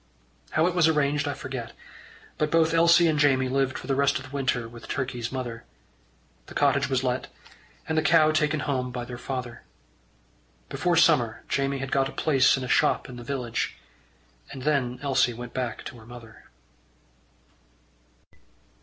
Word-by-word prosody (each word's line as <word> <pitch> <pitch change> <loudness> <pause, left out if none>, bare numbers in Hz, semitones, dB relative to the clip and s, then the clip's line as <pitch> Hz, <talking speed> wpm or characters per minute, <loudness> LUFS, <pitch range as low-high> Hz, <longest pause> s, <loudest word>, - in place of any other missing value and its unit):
How 155 - +2
it 180 - +1
was 175 -3 +4
arranged, 150 -2 +1
I 145 - -2
forget, 130 -4 -6 0.7
but 150 - +1
both 165 0 +3
Elsie 170 +1 +5
and 155 -2 +1
Jamie 135 -3 +3
lived 135 0 0
for - - -9
the 135 - 0
rest 140 +1 +2
of 130 - -8
the 130 +2 -10
winter 130 -4 -1
with 120 0 -12
Turkey's 125 -3 -3
mother. 120 -3 -5 0.8
The - - -12
cottage - - +2
was - - 0
let, - - -1 0.6
and 160 - -1
the 155 - +3
cow 155 -2 +4
taken 155 -1 +1
home 130 -2 -2
by 125 -1 -5
their 120 0 -8
father. 125 -3 -5 1.1
Before 175 -1 0
summer 145 -9 +3
Jamie 140 0 0
had 135 0 -5
got 135 -1 +1
a - - -11
place 140 -4 +3
in 130 - -4
a - - -4
shop - - +2
in 125 - -9
the 120 - -8
village, 125 -2 -3 0.7
and 130 - -8
then 130 -4 0
Elsie 130 -3 +2
went 120 +1 -8
back 125 -3 -3
to 125 - -8
her 110 - -15
mother. 120 -2 -13
135 Hz, 170 wpm, -26 LUFS, 125-150 Hz, 1.1 s, Elsie